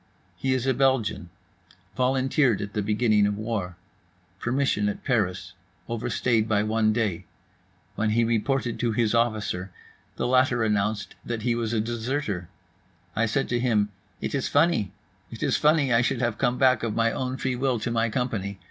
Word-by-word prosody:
He 130 Hz, -1 st, 0 dB
is 130 Hz, -1 st, -2 dB
a 135 Hz, -, +3 dB
Belgian. 125 Hz, -8 st, +1 dB, 0.7 s
Volunteered 130 Hz, -1 st, +2 dB
at 100 Hz, 0 st, -5 dB
beginning 105 Hz, -1 st, +3 dB
of 105 Hz, 0 st, -2 dB
war. 105 Hz, -5 st, -3 dB, 0.6 s
Permission 120 Hz, -5 st, +1 dB
at 105 Hz, -, -6 dB
Paris, 100 Hz, -8 st, -1 dB, 0.3 s
overstayed 115 Hz, -1 st, 0 dB
by 105 Hz, -1 st, +2 dB
one 110 Hz, 0 st, +2 dB
day. 110 Hz, -6 st, -1 dB, 0.7 s
When 110 Hz, 0 st, 0 dB
he 115 Hz, +2 st, +2 dB
reported 120 Hz, +2 st, 0 dB
to 120 Hz, -2 st, 0 dB
his 110 Hz, 0 st, +1 dB
officer, 110 Hz, -5 st, 0 dB, 0.5 s
the -, -, -2 dB
latter 125 Hz, -1 st, +3 dB
announced 105 Hz, 0 st, 0 dB
that 115 Hz, -2 st, -4 dB
he 120 Hz, -, +2 dB
was 115 Hz, -1 st, -2 dB
a 115 Hz, -, +1 dB
deserter—I 115 Hz, -, -4 dB
said 135 Hz, +5 st, 0 dB
to 120 Hz, -, +1 dB
him, 110 Hz, -4 st, +2 dB, 0.3 s
"It -, -, -3 dB
is 140 Hz, -2 st, 0 dB
funny. 145 Hz, -, +2 dB, 0.4 s
It -, -, -7 dB
is -, -, +2 dB
funny 150 Hz, -4 st, +3 dB
I 115 Hz, -, +5 dB
should 120 Hz, 0 st, 0 dB
have 120 Hz, -3 st, -1 dB
come 125 Hz, +1 st, +1 dB
back, 130 Hz, -4 st, +4 dB
of 115 Hz, -2 st, -2 dB
my 115 Hz, 0 st, +2 dB
own 130 Hz, +1 st, -3 dB
free 130 Hz, -1 st, -1 dB
will, 130 Hz, 0 st, 0 dB
to 120 Hz, -, -2 dB
my 115 Hz, 0 st, +1 dB
company. 105 Hz, -5 st, -2 dB
115 Hz, 165 wpm, -26 LUFS, 105-130 Hz, 0.7 s, I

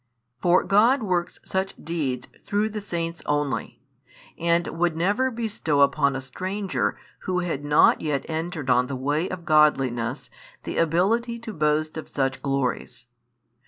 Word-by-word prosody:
For 180 Hz, +1 st, +4 dB
God 230 Hz, +6 st, +4 dB
works 180 Hz, -4 st, -1 dB
such 190 Hz, 0 st, -2 dB
deeds 140 Hz, -7 st, -3 dB, 0.2 s
through 205 Hz, +2 st, 0 dB
the 215 Hz, 0 st, -5 dB
saints 170 Hz, -3 st, -4 dB
only, 145 Hz, -4 st, -2 dB, 0.5 s
and 170 Hz, 0 st, +1 dB
would 170 Hz, -1 st, 0 dB
never 205 Hz, +10 st, +2 dB
bestow 215 Hz, -, -1 dB
upon 140 Hz, 0 st, +3 dB
a 135 Hz, -, -3 dB
stranger 185 Hz, +9 st, -2 dB, 0.3 s
who 180 Hz, -1 st, 0 dB
had 160 Hz, -5 st, -3 dB
not 145 Hz, 0 st, +4 dB
yet 145 Hz, -3 st, -1 dB
entered 160 Hz, -2 st, -4 dB
on 125 Hz, 0 st, +3 dB
the 140 Hz, -, -4 dB
way 145 Hz, +6 st, -1 dB
of 175 Hz, -2 st, -6 dB
godliness 135 Hz, -5 st, +2 dB, 0.3 s
the -, -, -5 dB
ability 205 Hz, +9 st, +1 dB
to 230 Hz, -2 st, -6 dB
boast 155 Hz, -1 st, 0 dB
of 160 Hz, -, -7 dB
such 135 Hz, -2 st, -1 dB
glories. 130 Hz, -3 st, -2 dB
165 Hz, 145 wpm, -25 LUFS, 140-190 Hz, 0.5 s, For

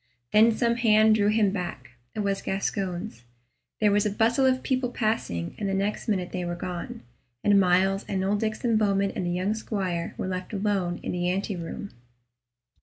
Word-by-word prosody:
Then 220 Hz, +2 st, +6 dB
some 235 Hz, +1 st, +1 dB
hand 220 Hz, -2 st, +5 dB
drew 205 Hz, -1 st, +3 dB
him 210 Hz, -2 st, +3 dB
back 175 Hz, -10 st, -5 dB, 0.2 s
it 215 Hz, -, -1 dB
was 200 Hz, -1 st, -1 dB
Gascoyne's 195 Hz, -, -3 dB, 0.6 s
there 210 Hz, -1 st, +4 dB
was 205 Hz, 0 st, +3 dB
a 210 Hz, -, +1 dB
bustle 230 Hz, +6 st, +2 dB
of 260 Hz, 0 st, +1 dB
people 255 Hz, -2 st, 0 dB
passing, 155 Hz, -, -2 dB
and 200 Hz, -, -1 dB
the 195 Hz, -, 0 dB
next 200 Hz, +2 st, -2 dB
minute 185 Hz, -5 st, -1 dB
they 180 Hz, -, -3 dB
were 175 Hz, 0 st, -3 dB
gone, 175 Hz, -4 st, -6 dB, 0.4 s
and 205 Hz, -1 st, +5 dB
Myles 190 Hz, +1 st, +3 dB
and 190 Hz, -1 st, -1 dB
old 205 Hz, +2 st, 0 dB
Diccon 220 Hz, +1 st, 0 dB
Bowman 200 Hz, -2 st, +2 dB
and 180 Hz, -, -3 dB
the -, -, 0 dB
young 185 Hz, +4 st, 0 dB
squire 190 Hz, -6 st, -3 dB
were -, -, -3 dB
left 185 Hz, +2 st, -4 dB
alone 195 Hz, -4 st, -1 dB
in -, -, -3 dB
the 175 Hz, 0 st, -1 dB
anteroom. 190 Hz, 0 st, -3 dB
200 Hz, 180 wpm, -26 LUFS, 180-215 Hz, 0.6 s, Then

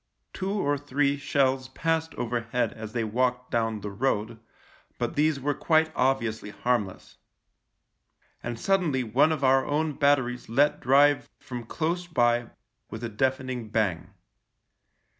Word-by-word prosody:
Two 195 Hz, +1 st, -3 dB
or 145 Hz, -8 st, 0 dB
three 145 Hz, 0 st, +1 dB
shells 135 Hz, -2 st, 0 dB
passed 160 Hz, +3 st, -1 dB
overhead 120 Hz, +1 st, -1 dB
as 110 Hz, -1 st, -8 dB
they 120 Hz, -2 st, 0 dB
walked 125 Hz, +3 st, -1 dB
down 115 Hz, -2 st, 0 dB
the 105 Hz, +1 st, -5 dB
road, 110 Hz, 0 st, -1 dB, 0.6 s
but -, -, -2 dB
these 150 Hz, -1 st, +2 dB
were 145 Hz, +2 st, 0 dB
quite 160 Hz, +2 st, +2 dB
obviously 115 Hz, -5 st, 0 dB
harmless. 105 Hz, -4 st, -2 dB, 1.2 s
And 120 Hz, -1 st, -5 dB
suddenly 170 Hz, -9 st, +1 dB
one 130 Hz, +8 st, +3 dB
of 155 Hz, -3 st, -2 dB
our 135 Hz, 0 st, +4 dB
own 150 Hz, +2 st, -1 dB
batteries 130 Hz, -5 st, +1 dB
let 145 Hz, +6 st, +3 dB
drive 140 Hz, +2 st, +4 dB
from 120 Hz, -2 st, -7 dB
close 170 Hz, +5 st, -2 dB
by 120 Hz, -6 st, +2 dB, 0.4 s
with 110 Hz, +1 st, -7 dB
a 115 Hz, -, -2 dB
deafening 130 Hz, 0 st, -2 dB
bang. 100 Hz, -4 st, -1 dB
130 Hz, 135 wpm, -27 LUFS, 115-145 Hz, 1.2 s, our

